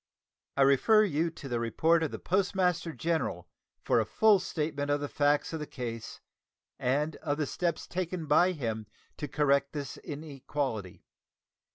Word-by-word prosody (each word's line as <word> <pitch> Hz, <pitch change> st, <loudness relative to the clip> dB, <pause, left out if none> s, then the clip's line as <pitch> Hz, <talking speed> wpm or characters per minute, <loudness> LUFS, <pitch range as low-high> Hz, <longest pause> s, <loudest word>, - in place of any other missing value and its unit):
I 140 Hz, -, +6 dB
refer 175 Hz, -, +5 dB
you 165 Hz, -4 st, +1 dB
to 150 Hz, -3 st, -10 dB
the 120 Hz, -2 st, -1 dB
report 160 Hz, +9 st, +2 dB
of 160 Hz, -, 0 dB
the -, -, -6 dB
Postmaster 180 Hz, -2 st, +1 dB
General 165 Hz, 0 st, -2 dB, 0.4 s
for -, -, +3 dB
a -, -, +3 dB
full 215 Hz, -3 st, +5 dB
statement 150 Hz, -5 st, -2 dB
of 145 Hz, 0 st, +2 dB
the 145 Hz, -, -3 dB
facts 145 Hz, +2 st, +1 dB
of 160 Hz, -, -2 dB
the 150 Hz, -, -5 dB
case 115 Hz, -3 st, -6 dB, 0.6 s
and 145 Hz, +5 st, 0 dB
of 145 Hz, -2 st, -2 dB
the 155 Hz, -, 0 dB
steps 170 Hz, +4 st, -2 dB
taken 180 Hz, -2 st, -3 dB
by 175 Hz, +5 st, +4 dB
him 110 Hz, -, -3 dB, 0.3 s
to 150 Hz, -, -4 dB
correct 140 Hz, -1 st, +2 dB
this 145 Hz, -3 st, -5 dB
inequality. 140 Hz, -, -5 dB
150 Hz, 160 wpm, -30 LUFS, 140-170 Hz, 0.6 s, I